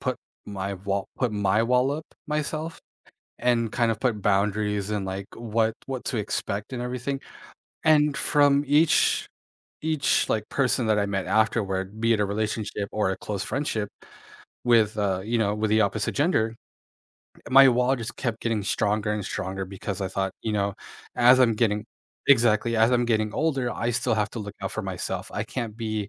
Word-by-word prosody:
put - - -1 0.3
my 100 -1 -4
wall 100 +1 -3
put 125 -4 0
my 105 +1 +2
wall 125 +3 +2
up 155 +2 -3 0.2
myself 155 +1 -3 0.6
and 115 -3 +1
kind 120 -1 +1
of 110 - -4
put 115 -5 0
boundaries 105 +1 0
and, 105 -2 -1
like, 95 +1 -4
what 115 -1 0
what 130 -2 -5
to 120 - -1
expect 105 0 -3
and 120 - -3
everything, 125 +2 -3 0.7
and 150 -2 +4
from 145 -1 +3
each 150 +3 +3 0.6
each, 155 -3 +1
like 110 -1 0
person 130 -3 +1
that 110 -1 +3
I 100 - +1
met 95 -2 -2
afterward, 100 -2 0
be 115 +1 +3
it 110 - 0
a - - +2
relationship 105 0 -2
or 105 -3 +1
a 95 - -2
close 100 -3 -4
friendship 115 -6 -2 0.8
with, 110 -3 +4
uh 95 -3 0
you 115 +3 -1
know, 105 -2 +1
with 105 0 -1
the 110 - +4
opposite 105 +1 0
gender, 140 -8 +1 1.0
my 135 +1 +8
wall 125 +1 +3
just 115 -1 -6
kept 120 -3 -3
getting 115 -3 -1
stronger 105 +1 0
and 105 -1 -2
stronger 95 +1 -4
because 95 0 -5
I 95 - -1
thought, 95 0 -2
you 110 - -2
know, 100 -1 0 0.4
as 125 +1 +6
I'm 120 -3 +5
getting 105 -1 +1 0.4
exactly 115 -3 +4
as 110 +1 +4
I'm 120 -1 +3
getting 110 -2 +1
older, 135 -6 0
I 120 - -1
still 120 -1 +1
have 105 -1 0
to - - -6
look 100 -1 -7
out - - -3
for - - -2
myself, - - -4
I - - -2
can't 115 -4 -5
be 110 -3 -3
110 Hz, 180 wpm, -25 LUFS, 105-125 Hz, 1.0 s, my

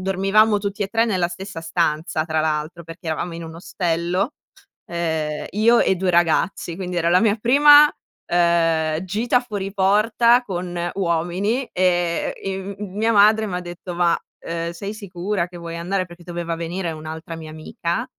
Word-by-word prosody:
dormivamo 195 +3 +3
tutti 200 +1 -3
e 195 - -2
3 230 +2 +2
nella 185 -6 0
stessa 185 -1 -7
stanza 160 -1 -1
tra 160 -1 0
l'altro, 155 +2 -2
perché 165 +1 -11
eravamo 160 +2 -2
in 170 - -7
un 160 0 -9
ostello. 175 - -1 0.5
Uhm, 160 -3 -2
io 230 +3 +4
e - - +3
2 185 0 0
ragazzi. 170 0 +1
Quindi, 180 -1 -5
era 170 0 +1
la 180 +2 +4
mia 220 -1 +3
prima, 290 +6 +7 0.4
uhm, 165 -2 +2
gita 225 +6 +1
fuori 205 -5 -5
porta 215 +5 +3
con 175 -4 -4
uomini 185 +7 0
e, 175 -2 +1
ehm, 195 0 -5
mia 210 +3 -1
madre 215 +1 +5
m'ha 180 -2 -3
detto: 175 0 -8
"Ma, 170 -1 +2 0.2
ehm, 165 0 -4
sei 200 +4 -6
sicura 195 -2 -3
che 175 - -12
vuoi 170 -1 -7
andare?" 185 +3 -1
Perché 175 0 -14
doveva 170 -1 -4
venire 170 +1 -3
un'altra 160 +1 -7
mia 160 -1 -9
amica, 160 +2 -3
180 Hz, 160 wpm, -21 LUFS, 170-200 Hz, 0.5 s, prima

